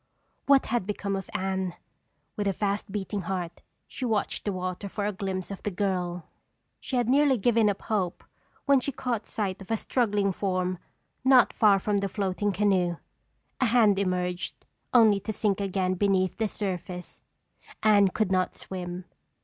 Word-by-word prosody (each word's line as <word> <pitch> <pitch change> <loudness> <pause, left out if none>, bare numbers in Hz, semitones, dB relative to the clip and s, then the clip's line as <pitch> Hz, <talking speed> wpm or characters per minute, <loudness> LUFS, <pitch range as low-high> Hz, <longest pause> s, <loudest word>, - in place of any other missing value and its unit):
What 275 -1 +5
had 230 -5 -1
become 200 -1 -2
of 195 -1 -5
Anne? 190 -1 -2 0.6
With 205 -1 -1
a 195 - +2
fast 200 +1 -2
beating 200 0 -3
heart, 175 -2 -4 0.3
she - - -7
watched 220 -4 -1
the 205 - 0
water 185 +1 -4
for 205 +1 -3
a 210 - 0
glimpse 190 -1 -4
of 195 - -6
the - - -2
girl. 180 -3 -2 0.5
She 265 - -4
had 245 -2 +1
nearly 275 +1 +4
given 225 0 +3
up 200 - -3
hope 190 -5 -1 0.4
when 280 -1 +5
she 280 - -3
caught 240 -5 -3
sight 195 -3 -3
of 190 - -11
a 225 - +1
struggling 205 -5 +1
form 185 -1 -1 0.4
not 260 -1 +6
far 210 -3 +5
from 200 +1 0
the 200 0 -2
floating 200 0 -1
canoe. 185 -3 +1 0.6
A 260 - +3
hand 215 -4 +4
emerged, 180 -2 -2 0.3
only 220 -5 +6
to 220 - -4
sink 205 -2 0
again 190 -1 0
beneath 185 -1 +1
the 220 - +2
surface. 180 -3 -5 0.6
Anne 205 -2 +6
could 190 +1 -1
not 185 -1 +1
swim! 180 -1 -6
200 Hz, 165 wpm, -27 LUFS, 185-215 Hz, 0.6 s, not